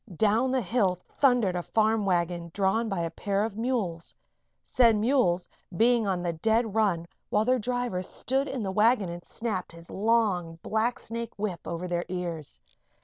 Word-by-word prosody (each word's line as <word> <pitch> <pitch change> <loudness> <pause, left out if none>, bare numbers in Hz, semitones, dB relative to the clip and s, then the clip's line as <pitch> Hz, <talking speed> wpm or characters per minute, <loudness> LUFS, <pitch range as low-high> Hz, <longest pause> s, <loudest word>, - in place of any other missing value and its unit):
Down 220 +6 +3
the 260 -1 +1
hill 195 -2 +1
thundered 245 -9 +2
a 175 - -1
farm 220 +2 +1
wagon 170 -1 0
drawn 205 +3 +1
by 195 -4 -1
a 165 -1 -2
pair 200 +3 -1
of 220 -2 -3
mules, 215 -8 -2 0.5
said 235 -3 +4
mules 210 -6 +2 0.3
being 235 0 +4
on 180 -2 -1
the 170 -1 -1
dead 220 +5 +1
run 200 -7 +1 0.2
while 210 +1 +2
their 255 +1 +3
driver 245 -4 -2
stood 265 +8 -2
in 265 -4 -3
the 190 - -2
wagon 210 -1 +3
and 175 0 -7
snapped 210 -6 -4
his 170 0 -12
long, 200 -6 +1
blacksnake 230 +1 -2
whip 200 -5 -4
over 170 +1 -4
their 175 -1 -1
ears. 170 - -4
210 Hz, 165 wpm, -27 LUFS, 175-230 Hz, 0.5 s, said